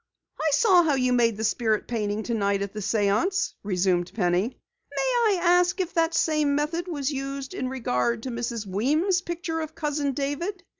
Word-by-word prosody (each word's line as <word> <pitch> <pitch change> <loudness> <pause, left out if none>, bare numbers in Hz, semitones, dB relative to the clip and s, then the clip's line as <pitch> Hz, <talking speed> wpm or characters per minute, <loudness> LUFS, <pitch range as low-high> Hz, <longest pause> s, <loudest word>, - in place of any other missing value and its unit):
"I 315 - +1
saw 365 +2 +5
how 310 -4 +2
you 255 -1 +1
made 230 -3 +2
the 220 - -3
spirit 220 -1 0
painting 215 -2 -2
tonight 200 -4 0
at 200 - -6
the 215 - -5
séance," 215 - +1
resumed 185 -3 0
Penny. 185 +3 0 0.3
"May 480 -5 +1
I - - -3
ask 355 +1 +3
if 365 -2 -2
that 330 0 +1
same 305 -3 +2
method 325 +4 -1
was 290 -4 -2
used 275 0 -5
in 255 - -3
regard 235 - -1
to 260 - -4
Mrs. 235 -2 -3
Weem's 300 - +1
picture 345 -2 -4
of 315 0 -5
Cousin 295 -2 -1
David?" 320 +8 -3
275 Hz, 180 wpm, -25 LUFS, 220-335 Hz, 0.3 s, saw